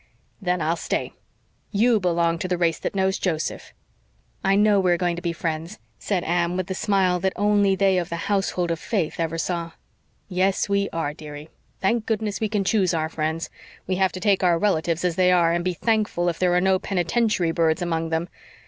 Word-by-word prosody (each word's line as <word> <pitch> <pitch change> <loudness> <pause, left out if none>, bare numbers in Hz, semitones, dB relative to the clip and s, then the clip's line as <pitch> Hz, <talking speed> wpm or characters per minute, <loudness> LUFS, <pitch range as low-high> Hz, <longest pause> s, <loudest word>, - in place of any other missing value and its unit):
"Then 180 -2 0
I'll 165 +2 0
stay. - - -3 0.6
YOU 225 +2 +3
belong 170 -2 +1
to 185 - -2
the 180 -1 0
race 170 -2 +1
that - - -4
knows 190 0 +1
Joseph." 165 -4 -2 0.7
"I 195 0 +3
know 205 0 +4
we 185 -2 +2
are - - +1
going 175 -1 0
to 170 - -6
be 170 - -1
friends," 165 +3 -4 0.2
said 190 -4 -1
Anne, 175 +1 0
with 185 - -1
the 190 - -4
smile 190 -2 +1
that 190 +1 0
only 205 -1 +3
they 190 -1 +3
of 175 - -4
the 170 - -3
household 190 -3 0
of 165 - -2
faith 185 -7 -2
ever 165 0 -1
saw. 170 0 -3 0.5
"Yes, 190 +1 +1
we 200 0 +1
are, 160 -3 -2
dearie. 150 0 -10 0.3
Thank 220 +3 +1
goodness, 215 -2 -1
we 220 - -1
can 205 -2 0
choose 190 -4 +2
our 160 -1 -1
friends. 160 +1 -3 0.3
We 185 0 -1
have 190 -1 +2
to 185 - -5
take 195 0 +2
our 175 -2 +4
relatives 170 -2 0
as 175 -2 0
they 180 -1 +4
are, 170 -2 +4
and 175 0 0
be 180 0 -1
thankful 210 -5 0
if 170 - -4
there 180 -1 +2
are - - +4
no 190 0 +3
penitentiary 190 -1 0
birds 165 0 +1
among 165 -1 -1
them. 160 +1 -1
180 Hz, 210 wpm, -23 LUFS, 165-195 Hz, 0.7 s, know